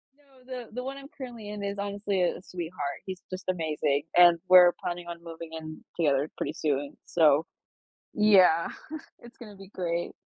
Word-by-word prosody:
No, 275 -3 -24
the 250 -3 -7
the 250 +3 -5
one 270 +1 -5
I'm 275 0 -10
currently 240 -8 -9
in 210 -1 -6
is 200 0 -3
honestly 200 -1 -2
a 175 - +1
a - - -12
sweetheart. 175 -1 -5
He's 185 -1 -6
just 185 +1 -7
amazing, 150 -4 0
and 175 -1 +7
we're 180 -1 +8
planning 175 0 -4
on 170 0 -8
moving 165 -1 -8
in 155 -1 -8
together 145 -2 +2
pretty 145 - -3
soon, 145 -3 -2
so, 155 -1 +4 0.7
yeah, 190 -6 +5 0.5
it's 240 +1 -15
gonna 210 -4 -11
be 195 -1 -13
great. 175 -3 -3
180 Hz, 175 wpm, -28 LUFS, 165-210 Hz, 0.7 s, we're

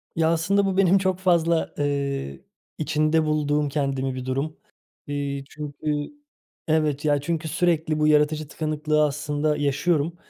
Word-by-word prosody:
Ya, 165 0 +2
aslında 195 +5 +2
bu 190 -1 -1
benim 195 0 +5
çok 185 -1 0
fazla, 170 -3 +2
eee, 140 - -2 0.4
içinde 155 +1 +1
bulduğum 150 -1 +1
kendimi 135 -2 -1
bir 130 -1 -5
durum. 135 +4 -2 0.5
Eee, 140 -1 -3
çünkü 150 0 -4 0.6
evet 155 -2 +1
ya 145 -2 +2
çünkü 160 +1 -2
sürekli 160 -1 +1
bu 150 - +3
yaratıcı 150 0 +2
tıkanıklığı 155 0 0
aslında 150 +1 -1
yaşıyorum 145 +3 0
150 Hz, 135 wpm, -24 LUFS, 145-160 Hz, 0.6 s, benim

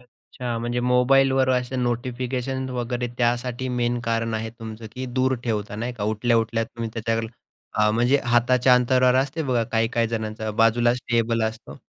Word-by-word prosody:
अच्छा, 125 -1 -7
म्हणजे 120 +1 -2
मोबाईलवर 130 +2 +3
असे 125 0 0
नोटिफिकेशन 125 +1 -2
वगैरे 120 0 -2
त्यासाठी 120 +1 0
मेन 120 0 0
कारण 115 0 -1
आहे 110 0 -3
तुमचं, 110 -1 -9
की 130 0 -5
दूर 130 +1 +1
ठेवता 105 -3 -2
नाही 120 +3 -3
का. 105 -4 -4
उठल्या-उठल्या 115 +1 +1
तुम्ही 115 0 -6
त्याच्या 115 0 -1 0.6
हां, 105 0 +4
म्हणजे 125 +5 +3
हाताच्या 125 +1 +4
अंतरावर 125 0 +3
असते 145 +4 -2
बघा, 125 -4 +1
काही-काही 115 +1 +1
जणांचा 110 -1 -3
बाजूलाच 120 +2 +3
टेबल 115 -1 +1
असतो. 110 +1 -6
120 Hz, 150 wpm, -24 LUFS, 115-125 Hz, 0.6 s, हां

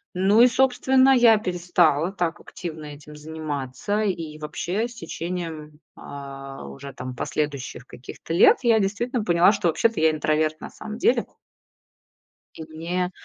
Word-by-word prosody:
Ну 200 +5 +4
и, 245 - +8
собственно, 265 +1 +3
я 230 -3 +6
перестала 175 -3 +1
так 175 -4 -2
активно 160 -4 -8
этим 150 +1 -11
заниматься. 155 +5 -4
И 165 -7 -3
вообще, 180 +8 -3
с 240 - -14
течением, 165 -4 -6 0.2
а, 135 -1 -9
уже 140 0 -9
там 125 0 -7
последующих 140 -3 -4
каких-то 130 +6 -9
лет 170 - +6
я 230 -2 +4
действительно 215 +4 -1
поняла, 175 +1 +4
что 200 -4 -1
вообще-то 225 +5 +1
я 160 0 +4
интроверт 155 0 0
на - - -8
самом 215 0 -8
деле. 240 0 +2 1.3
И 160 - -7
мне 175 +3 -3
170 Hz, 140 wpm, -24 LUFS, 150-210 Hz, 1.3 s, и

